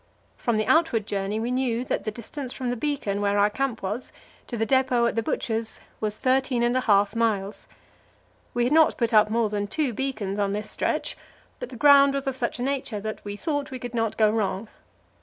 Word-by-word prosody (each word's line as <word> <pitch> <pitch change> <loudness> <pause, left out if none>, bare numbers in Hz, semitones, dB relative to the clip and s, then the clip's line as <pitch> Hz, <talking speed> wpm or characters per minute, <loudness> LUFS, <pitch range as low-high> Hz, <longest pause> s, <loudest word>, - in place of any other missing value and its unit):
From 235 -2 -1
the 215 - +1
outward 315 -10 +3
journey 200 +1 -2
we 235 +2 -2
knew 250 -1 0
that - - -2
the - - 0
distance 245 +4 -6
from 255 -2 -3
the - - -1
beacon 235 -7 -2
where 200 0 +1
our 205 +1 +4
camp 260 -1 -2
was 210 +6 -3 0.4
to 240 - -4
the 225 - +1
depot 255 -1 +2
at 235 - +1
the 230 - +1
Butcher's 225 0 -2 0.2
was 215 -1 -2
thirteen 260 -2 +1
and 240 +1 +2
a 255 - +2
half 205 -2 +3
miles. 215 -3 -1 0.9
We 240 - +2
had 250 +4 +1
not 320 0 +5
put 235 -2 0
up 215 -1 +6
more 225 0 +1
than 205 -1 -1
two 270 +3 -1
beacons 215 -6 -3
on 200 -1 +1
this 210 +1 -4
stretch, - - -1 0.4
but - - -6
the - - -9
ground 280 -1 +6
was 275 0 -2
of 270 -1 -1
such 245 -2 -2
a 245 - -3
nature 265 -5 -2
that 215 +1 -6
we 205 0 -5
thought 290 +4 -2
we 260 - -5
could 245 -1 -7
not 225 -2 -1
go 215 -1 +4
wrong. 210 -1 -1
230 Hz, 220 wpm, -25 LUFS, 210-260 Hz, 0.9 s, up